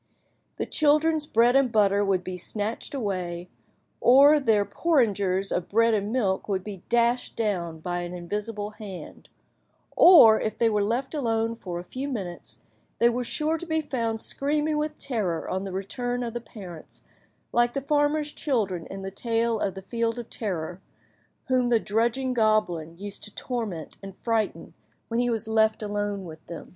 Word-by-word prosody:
The - - -2
children's 305 0 +2
bread 240 +1 +4
and 270 -3 +4
butter 205 -2 +3
would 190 -2 +1
be 185 - -5
snatched 210 +8 -4
away, 180 -7 -3 0.5
or 280 +4 +7
their 220 -6 +2
porringers 200 - +1
of 180 - -2
bread 230 +2 +3
and 205 0 0
milk 210 -6 0
would 190 -2 -1
be 200 -3 -8
dashed 240 +1 +2
down 175 -7 -2
by 175 +1 -2
an 175 0 -5
invisible 205 +4 -4
hand; 205 -4 -10 0.7
or 260 -12 +8
if 215 - -2
they 230 -1 +3
were 210 -1 +1
left 240 +7 -1
alone 230 -5 0
for 180 -6 -6
a 175 - -5
few 260 +9 -5
minutes, 190 -10 -6 0.4
they 235 - +5
were 245 +1 -1
sure 310 +6 -1
to 345 - -6
be 320 -1 +1
found 230 -6 -2
screaming 300 +5 -1
with 300 0 -3
terror 200 - -2
on 190 +1 -2
the 195 - -5
return 245 +6 -3
of 230 -2 -4
the 240 - -4
parents, 180 -8 -10 0.5
like 240 +1 +2
the - - +1
farmer's 295 +1 +1
children 200 - -1
in 195 0 -7
the 195 - -5
tale 230 +1 0
of 195 -3 -1
the 195 - -8
Field 230 +3 -1
of 240 -1 -7
Terror, 180 -4 -4 0.6
whom 255 -2 +2
the 235 -2 +4
"drudging 235 +5 0
goblin" 215 -8 +1
used 200 +1 -8
to 210 - -14
torment 220 - -4
and 195 -1 -10
frighten 225 -3 -1 0.4
when 230 +1 0
he 245 0 +2
was 225 -1 -2
left 220 0 +2
alone 205 -2 -2
with 160 -1 -10
them. 170 -1 -8
220 Hz, 175 wpm, -26 LUFS, 195-245 Hz, 0.7 s, or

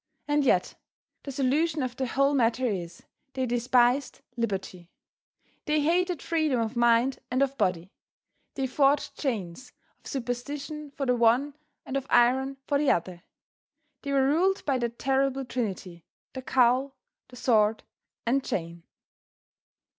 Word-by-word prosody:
And 295 0 +2
yet, 185 -9 +2 0.5
the 280 - -7
solution 285 +3 0
of 250 -1 -4
the 260 0 -2
whole 275 +4 +2
matter 250 -1 +2
is, 175 -7 -4 0.3
they 260 -1 -1
despised 245 +2 +1
liberty; 195 -6 -4 0.8
they 300 -1 +1
hated 350 +2 +1
freedom 315 -6 0
of 225 +1 -2
mind 240 +2 +3
and 255 +2 +2
of 275 0 -2
body. 185 -5 -1 0.6
They 270 - -1
forged 275 +2 +1
chains 220 - -4 0.3
of - - -15
superstition 280 +4 -5
for 275 0 -4
the 250 -1 +2
one 245 +5 +2 0.3
and 265 - -5
of 275 0 -2
iron 265 +3 +3
for 285 - +1
the 295 - +2
other. 175 0 -1 0.8
They 280 - -4
were 270 -1 +3
ruled 365 +7 +1
by 270 -3 +1
that 235 -1 -3
terrible 270 0 0
trinity, 190 -9 -5 0.3
the 260 - -6
cowl, 260 +2 +2 0.3
the 250 - -14
sword 220 -3 +2 0.4
and 265 +3 +1
chain. 170 -4 -4
255 Hz, 140 wpm, -27 LUFS, 230-275 Hz, 0.8 s, mind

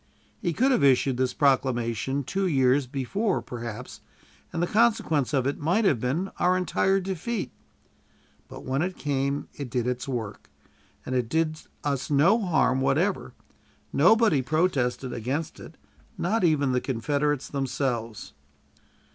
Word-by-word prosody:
He 175 - 0
could 260 - +2
have 250 - +2
issued 135 -1 +3
this 130 -1 0
proclamation 130 -1 +1
two 190 +8 -1
years 135 -3 +2
before, 180 - -1
perhaps, 120 -3 -7 0.5
and 165 - -4
the 175 - +2
consequence 210 - +2
of 135 -3 +1
it 140 - -1
might 180 +9 +1
have 140 - +3
been 150 - -2
our 180 +1 +3
entire 190 +1 +1
defeat; 190 - -3 1.0
but - - -11
when 135 +2 -1
it 180 +2 -2
came 140 0 -1
it 140 -4 -6
did 120 -1 -1
its 125 +1 -2
work, 115 -6 -5 0.6
and 130 - -4
it 125 -3 0
did 155 +1 0 0.2
us 140 -2 -2
no 160 +10 +4
harm 135 -9 +2
whatever. - - 0 0.6
Nobody 185 - +4
protested 135 -4 0
against 140 +8 -3
it, 160 - -12 0.4
not 205 +4 0
even 145 -5 +2
the 125 0 +1
Confederates 145 +3 -1
themselves. 125 - -3
140 Hz, 140 wpm, -26 LUFS, 125-175 Hz, 1.0 s, no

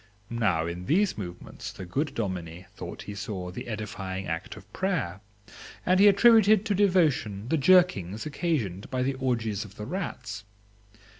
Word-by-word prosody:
Now 105 -9 +1
in 85 +2 -5
these 195 +5 +3
movements 90 -4 -7
the 95 - -8
good 140 - -2
dominie 90 -4 -4
thought 90 -3 -7
he 105 - -7
saw 95 -3 -5
the - - -7
edifying 100 -4 -4
act 80 -2 -4
of 105 0 -15
prayer, 155 - -1 0.6
and 185 +1 +4
he 205 - +8
attributed 215 0 +6
to 210 - +1
devotion 160 - +2
the 160 - +2
jerkings 140 - +3
occasioned 140 - -2
by 130 -1 0
the 135 +1 0
orgies 115 -5 -1
of 105 -1 -13
the 105 - -6
rats. 120 - -5
110 Hz, 155 wpm, -27 LUFS, -, 0.6 s, he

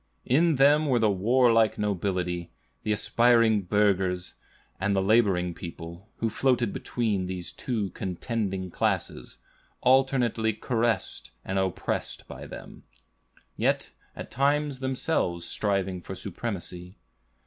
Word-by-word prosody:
"In 160 +5 +3
them 145 +3 +5
were 130 -3 +3
the 110 -3 +3
warlike 115 +3 +3
nobility, 90 -4 -2 0.3
the 105 - -2
aspiring 115 0 +3
burghers, 95 -2 +1 0.5
and 100 +1 +1
the - - +3
laboring 95 -4 +2
people, 85 +3 -9
who 115 - 0
floated 120 0 +1
between 105 -6 -1
these 90 -2 -4
two 110 -7 -3
contending 95 0 -3
classes, - - -2 0.4
alternately 125 -4 +3
caressed 115 +1 -1 0.2
and 95 0 -1
oppressed 95 -2 -2
by - - -9
them, - - -10 0.7
yet - - 0 0.2
at - - -8
times 140 +1 +1
themselves 130 - -1
striving 95 -2 -1
for 95 - -7
the - - -7
supremacy. 90 -2 -4
105 Hz, 115 wpm, -27 LUFS, 95-120 Hz, 0.7 s, them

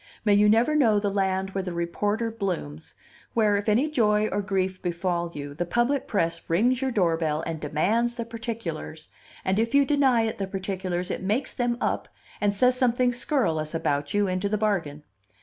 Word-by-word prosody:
May 205 - +5
you 205 +1 +5
never 230 +8 +4
know 225 -8 +4
the 205 -1 -1
land 190 -1 0
where 195 - -2
the 180 -2 -5
reporter 205 +7 -1
blooms, 180 - -4 0.4
where 215 -3 +3
if 205 +2 -1
any 240 +8 +3
joy 215 -7 +2
or 205 - -1
grief 190 -2 -1
befall 175 -1 -2
you, 145 -1 -6
the 160 - -2
public 240 +9 0
press 170 -5 0
rings 235 +10 +2
your 265 - +1
doorbell 165 -8 +1
and 165 -1 -4
demands 210 +11 0
the 235 -1 -4
particulars, 225 -9 -6 0.4
and 190 +2 +1
if 230 +4 0
you 280 0 +6
deny 265 -5 +3
it 220 -2 -3
the 195 - -2
particulars, 190 -2 -3
it - - -3
makes 215 +8 -1
them 240 -1 -1
up - - -1 0.3
and 205 -1 +3
says 250 +5 +3
something 250 0 +2
scurrilous 170 - 0
about 145 -3 -1
you 205 0 +2
into 185 +2 -1
the 215 - 0
bargain. 175 -9 -1
200 Hz, 185 wpm, -26 LUFS, 175-230 Hz, 0.4 s, you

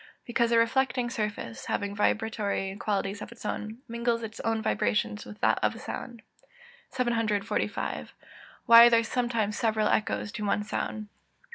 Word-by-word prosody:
_ - - -20 0.2
Because 235 -1 +1
the 235 - +3
reflecting 245 +1 +1
surface, 210 - -4
having 200 0 -2
vibratory 205 -2 0
qualities 200 -1 -2
of - - -7
its 235 - -12
own, 220 +4 -4
mingles 235 0 -1
its 220 -1 -7
own 225 0 0
vibrations 105 - 0
with 105 0 -11
that 110 - +3
of 105 0 +2
the - - -10
sound. 235 -4 -7 0.7
745. 230 -5 -1 0.6
_Why 235 0 +10
are - - +6
there 230 -1 +4
sometimes 230 -3 -1
several 220 -3 +1
echoes 210 -1 0
to 210 - -5
one 210 0 +1
sound? 215 0 -4
220 Hz, 155 wpm, -28 LUFS, 205-235 Hz, 0.7 s, Why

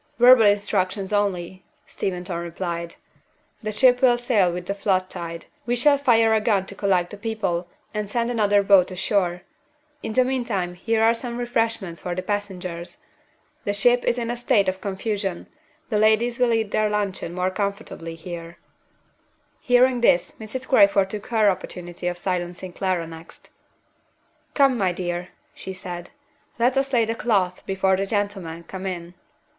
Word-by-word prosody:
"Verbal 245 -2 +8
instructions 200 -1 0
only," 190 -3 -1 0.2
Steventon 180 -1 -4
replied. 170 0 -4 0.7
"The 215 -1 -3
ship 250 +3 +4
will 245 -2 +5
sail 225 -7 +2
with 175 0 -5
the 200 - -2
flood 190 -2 0
tide. 170 0 -6 0.2
We 240 - +1
shall 280 +3 +4
fire 230 -5 +4
a 220 - +3
gun 205 -4 +1
to 200 - -9
collect 185 -3 +1
the 205 - -8
people, 200 -5 -2 0.3
and 210 -2 -3
send 235 +2 0
another 205 -3 +3
boat 195 -2 +5
ashore. 180 -1 -1 0.6
In 220 - -4
the 255 +2 +4
meantime 235 -9 -1
here 225 +5 0
are 225 +1 +5
some 235 0 -4
refreshments 225 -7 -2
for 175 -1 -3
the 185 - -3
passengers. 185 -4 -4 0.7
The 205 - -1
ship 245 +4 +4
is 240 - +1
in 235 -1 -2
a 240 - -4
state 240 -4 +2
of 185 0 -2
confusion; 195 -2 -3 0.5
the 210 - +2
ladies 220 +3 +3
will 245 -1 +3
eat 220 -2 0
their 215 0 +2
luncheon 200 -4 -2
more 185 +1 0
comfortably 200 -4 -4
here." 170 0 -8 1.0
Hearing 250 -2 +3
this, 175 -7 +3
Mrs. 240 +4 -6
Crayford 200 -5 +4
took 210 -1 -6
her 220 -3 +3
opportunity 180 -2 -3
of 175 0 -2
silencing 180 0 -3
Clara 185 -3 -1
next. 165 0 -13 1.0
"Come, 270 -4 +4
my 185 -3 +1
dear," 175 0 -4 0.2
she 190 - -7
said. 180 -2 -7 0.5
"Let 245 +2 +2
us 270 0 0
lay 235 -3 +3
the 225 - -1
cloth 195 -6 0
before 190 0 +2
the 195 +1 -1
gentlemen 195 -6 -3
come 190 +2 -6
in." 175 -2 -5
200 Hz, 160 wpm, -23 LUFS, 180-230 Hz, 1.0 s, Verbal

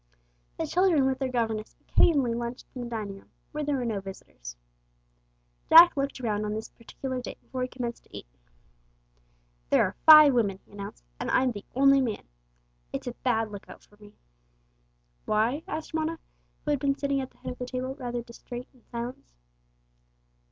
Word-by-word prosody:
The - - -1
children 350 -6 +3
with 265 0 0
their 265 -2 -1
governess 225 -3 -2
occasionally 275 -8 +3
lunched 235 +2 -5
in 255 - -6
the 240 - -5
dining 210 -4 -5
room, - - -23 0.2
when 300 0 -3
there 290 - +1
were 255 -2 -2
no 220 -4 -1
visitors. - - -10 1.1
Jack 335 +2 +10
looked 275 -1 -2
around 215 -4 -1
on 210 0 -2
this 220 - -5
particular 255 +2 -6
day - - -7
before 255 - -6
he 255 - 0
commenced 245 -2 -6
to - - -11
eat. - - -9 1.4
"There - - +5
are 185 - -2
five 305 -3 +10
women," 205 -6 +1
he - - -25
announced; 200 - -8 0.2
"and - - -3
I'm 260 -1 +3
the 205 -3 -8
only 275 +1 +5
man. 230 -5 -3 0.6
It's - - -5
a 245 - -3
bad 225 -4 0
lookout 200 -1 -10
for 205 - -23
me!" 210 0 -16 1.1
"Why?" 225 +7 +1
asked 310 +1 -5
Mona, 320 +1 -1 0.5
who 300 - +1
had 290 - +1
been 275 +1 +1
sitting 280 -1 0
at 260 - -6
the - - -29
head - - -6
of 250 - -10
the 250 - -4
table 255 +1 -3
rather 245 -3 -4
distrait 240 +1 -9
and 250 - -25
silent. 240 +1 -6
250 Hz, 180 wpm, -28 LUFS, 220-275 Hz, 1.4 s, Jack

